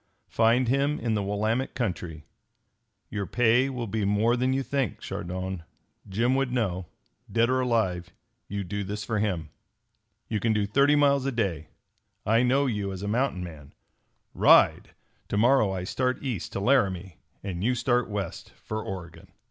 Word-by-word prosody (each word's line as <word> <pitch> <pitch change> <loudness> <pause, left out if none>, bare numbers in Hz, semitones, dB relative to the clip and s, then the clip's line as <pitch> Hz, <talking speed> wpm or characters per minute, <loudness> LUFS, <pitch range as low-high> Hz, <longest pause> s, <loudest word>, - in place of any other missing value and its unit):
Find 115 +2 +3
him 140 +4 +1
in 115 -2 -1
the 105 - 0
Willamette 110 +6 -1
country. 90 - -3 0.9
Your 100 -2 -3
pay 125 +2 +3
will 125 -3 -4
be 110 0 -2
more 105 +4 +2
than 130 +1 +1
you 135 +1 0
think, 135 -6 -2
Chardon. 95 +1 -5 0.5
Jim 115 +6 +1
would 135 -1 +1
know. 95 -8 -1 0.4
Dead 115 +2 +3
or 130 - +2
alive, 100 -8 0 0.4
you 100 0 -3
do 100 +3 -3
this 105 +2 -4
for 105 0 -1
him. 90 -7 -1 0.8
"You 110 - -1
can 110 +1 +1
do 105 -1 +1
thirty 140 +8 +4
miles 140 -2 +3
a - - 0
day. 95 - -2 0.6
I 115 +2 +4
know 130 +3 +3
you 105 -6 -1
as 95 0 -6
a - - -3
mountain 115 -4 0
man. 75 -5 -10 0.6
Ride! - - +4 0.3
To 100 - -2
morrow 115 -2 +4
I 95 -1 -3
start 125 +7 -1
east 120 -10 -3
to - - -2
Laramie 95 - +1 0.3
and 95 -2 -4
you 125 +3 +2
start 120 0 +1
west 100 -4 -4
for 110 0 -5
Oregon!" 85 -4 -8
110 Hz, 165 wpm, -27 LUFS, 95-125 Hz, 0.9 s, thirty